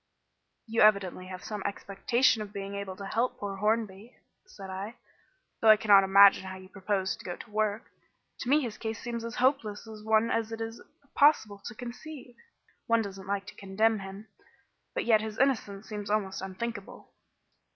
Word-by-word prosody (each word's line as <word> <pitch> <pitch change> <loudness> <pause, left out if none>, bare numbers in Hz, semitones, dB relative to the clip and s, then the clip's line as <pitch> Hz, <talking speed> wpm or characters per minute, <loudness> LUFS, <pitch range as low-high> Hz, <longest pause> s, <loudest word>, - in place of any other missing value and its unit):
"You 225 -1 0
evidently 200 -3 +3
have 185 0 -8
some 210 -2 -5
expectation 215 +4 +1
of 205 -1 -6
being 200 -1 -6
able 200 -2 -5
to 200 - -8
help 230 +5 -1
poor 200 -1 -5
Hornby," 215 +1 -1 0.3
said 195 -2 -10
I, 195 +4 -6 0.7
"though 225 - +5
I 215 - +9
cannot 200 -2 +6
imagine 195 0 +7
how 190 0 -6
you 185 0 -13
propose 195 -1 -1
to - - -14
go 175 - -5
to 215 - -12
work. 215 +1 0 0.6
To 245 - -4
me 295 +3 +5
his 230 -5 -5
case 225 0 -4
seems 235 -1 -5
as 230 -1 -5
hopeless 245 -6 +1
a 220 - -9
one 220 +1 +3
as 225 -1 -1
it 225 - -5
is 225 0 -5 0.3
possible 220 -9 +3
to 220 - -6
conceive. 250 +2 -9 0.5
One 230 -1 +3
doesn't 195 -1 -8
like 200 0 -2
to - - -11
condemn 210 +3 +1
him, 195 +2 -9 0.7
but - - -1
yet 220 -2 +5
his 220 0 -6
innocence 220 -7 0
seems 210 -2 -5
almost 200 -3 -1
unthinkable." 195 +2 -6
210 Hz, 180 wpm, -29 LUFS, 195-225 Hz, 0.7 s, I